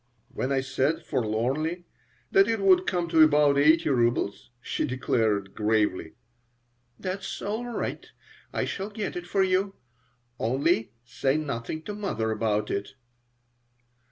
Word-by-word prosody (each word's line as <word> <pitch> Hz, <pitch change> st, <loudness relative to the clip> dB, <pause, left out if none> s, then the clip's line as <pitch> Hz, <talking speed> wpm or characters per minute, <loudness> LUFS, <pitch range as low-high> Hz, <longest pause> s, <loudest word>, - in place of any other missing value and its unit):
When 130 Hz, -, -2 dB
I 135 Hz, -1 st, +2 dB
said, 135 Hz, +4 st, -1 dB
forlornly, 135 Hz, +10 st, -1 dB, 0.5 s
that 195 Hz, +1 st, +5 dB
it 225 Hz, -1 st, 0 dB
would 185 Hz, -2 st, +4 dB
come 175 Hz, -2 st, 0 dB
to 165 Hz, -1 st, +4 dB
about 150 Hz, -2 st, +5 dB
eighty 160 Hz, +3 st, +5 dB
rubles, 120 Hz, -5 st, 0 dB
she -, -, -3 dB
declared, 110 Hz, -7 st, 0 dB
gravely: 105 Hz, -6 st, 0 dB, 0.8 s
"That's 190 Hz, +1 st, -4 dB
all 220 Hz, +4 st, -3 dB
right. 240 Hz, -, -4 dB, 0.4 s
I -, -, -1 dB
shall 195 Hz, +1 st, -4 dB
get 210 Hz, -1 st, -4 dB
it 175 Hz, 0 st, -6 dB
for 195 Hz, +2 st, +2 dB
you. 190 Hz, +1 st, +1 dB, 0.6 s
Only, 115 Hz, -1 st, +1 dB
say 135 Hz, +4 st, 0 dB
nothing 150 Hz, +1 st, -4 dB
to 205 Hz, -, -5 dB
mother 190 Hz, -, -2 dB
about 105 Hz, -1 st, 0 dB
it." 100 Hz, +4 st, -4 dB
145 Hz, 130 wpm, -27 LUFS, 115-185 Hz, 0.8 s, that